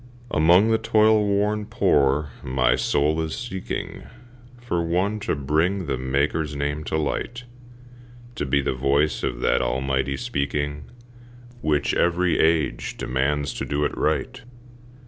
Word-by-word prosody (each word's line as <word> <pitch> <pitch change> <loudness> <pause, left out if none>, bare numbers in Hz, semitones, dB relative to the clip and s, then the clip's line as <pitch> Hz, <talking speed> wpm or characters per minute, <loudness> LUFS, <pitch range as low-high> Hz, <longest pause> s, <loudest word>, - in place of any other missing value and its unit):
Among 90 +8 +5
the 110 - +3
toil 110 -1 +4
worn 105 +1 0
poor 70 0 +2
my 65 -1 +2
soul 75 +5 +1
is 80 -1 -3
seeking 105 -7 -5 0.6
For 90 -8 -2
one 95 +6 0
to 100 - -1
bring 80 +7 0
the 70 - -1
Maker's 70 +3 -1
name 75 +1 -2
to 80 - -1
light, 120 +10 -3 0.9
To 95 - -3
be 70 +1 +2
the - - 0
voice 70 +4 +1
of - - -3
that - - +2
almighty 65 +1 -1
speaking 70 +2 -3 0.8
Which 75 -2 +1
every 85 +1 +1
age 80 -1 +1
demands 70 +3 -1
to - - -4
do 75 +1 -1
it - - -2
right. - - -1
75 Hz, 135 wpm, -23 LUFS, 70-90 Hz, 0.9 s, Among